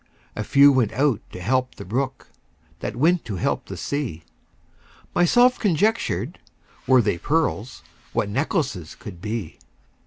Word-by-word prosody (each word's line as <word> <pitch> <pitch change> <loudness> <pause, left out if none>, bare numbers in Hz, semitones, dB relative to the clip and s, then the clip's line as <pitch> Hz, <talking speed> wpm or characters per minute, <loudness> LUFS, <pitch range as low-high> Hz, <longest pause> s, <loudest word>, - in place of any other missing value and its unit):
A 110 - -2
few 140 +6 +6
went 125 -6 +2
out 135 -5 +1
to - - -8
help 130 +7 0
the - - -9
brook, 130 +7 -3 0.5
That - - -4
went 165 +7 +3
to 110 -4 -4
help 90 - -1
the - - -7
sea. 130 - -3 0.9
Myself 245 +9 +4
conjectured, 180 - 0 0.5
Were 130 -2 +6
they 85 - 0
pearls, 145 - -1 0.3
What - - 0
necklaces 115 - -2
could 100 -9 -10
be! 105 -4 -4
130 Hz, 135 wpm, -23 LUFS, 105-155 Hz, 0.9 s, few